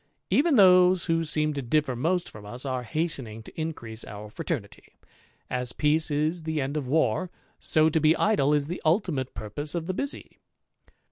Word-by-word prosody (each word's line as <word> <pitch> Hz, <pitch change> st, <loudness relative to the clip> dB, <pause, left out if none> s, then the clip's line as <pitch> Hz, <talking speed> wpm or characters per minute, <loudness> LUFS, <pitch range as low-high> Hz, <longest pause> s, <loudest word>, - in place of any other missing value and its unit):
Even 300 Hz, 0 st, +4 dB
^^ose 185 Hz, -3 st, +6 dB
who 165 Hz, -1 st, +1 dB
seem 155 Hz, -1 st, 0 dB
to 140 Hz, -, -3 dB
differ 135 Hz, +1 st, 0 dB
most 170 Hz, +8 st, 0 dB
from 105 Hz, -, -11 dB
us 120 Hz, +6 st, -7 dB
are 130 Hz, -2 st, -2 dB
hastening 125 Hz, -5 st, -3 dB
to -, -, -12 dB
increase 120 Hz, -9 st, -5 dB
our 105 Hz, +1 st, -9 dB
fraternity; -, -, -6 dB, 0.5 s
as 125 Hz, -1 st, -3 dB
peace 155 Hz, +2 st, +2 dB
is 155 Hz, +4 st, 0 dB
the 160 Hz, -1 st, -2 dB
end 135 Hz, +1 st, -2 dB
of 145 Hz, -4 st, -2 dB
war, 160 Hz, +5 st, +1 dB, 0.3 s
so 155 Hz, 0 st, +3 dB
to 160 Hz, 0 st, +2 dB
be 155 Hz, +1 st, +5 dB
^^e 150 Hz, -9 st, +2 dB
is 145 Hz, -1 st, +1 dB
the 175 Hz, +5 st, -5 dB
ultimate 160 Hz, -, 0 dB
purpose 145 Hz, -, -4 dB
of 165 Hz, -2 st, -2 dB
the 185 Hz, -, -2 dB
busy. 275 Hz, +9 st, -5 dB
155 Hz, 180 wpm, -26 LUFS, 130-170 Hz, 0.5 s, ^^ose